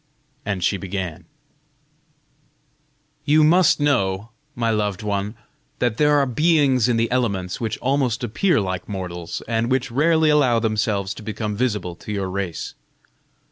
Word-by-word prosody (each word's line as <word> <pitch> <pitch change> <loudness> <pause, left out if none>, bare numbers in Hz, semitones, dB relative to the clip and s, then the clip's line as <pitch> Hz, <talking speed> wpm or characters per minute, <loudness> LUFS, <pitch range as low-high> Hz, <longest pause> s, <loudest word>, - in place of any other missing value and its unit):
And 100 -3 -2
she 100 +2 +2
began: 95 -4 -5 2.0
"You 155 +1 +4
must 170 +1 +5
know, 110 -7 0 0.2
my 115 -1 0
loved 105 -1 -1
one, 100 +1 -2 0.4
that 120 -3 0
there 150 0 +4
are 140 - +3
beings 135 -3 +3
in 120 - +2
the 115 0 0
elements 100 -8 -1
which 110 -2 -2
almost 130 -2 0
appear 150 - +1
like 95 -1 -3
mortals, 90 -3 -5
and 115 +1 0
which 130 -1 0
rarely 160 +4 +3
allow 135 -6 +4
themselves 105 -3 0
to - - -11
become 105 -1 -4
visible 105 -6 -1
to - - -8
your 100 -2 -2
race. 95 -3 -4
115 Hz, 140 wpm, -22 LUFS, 100-135 Hz, 2.0 s, must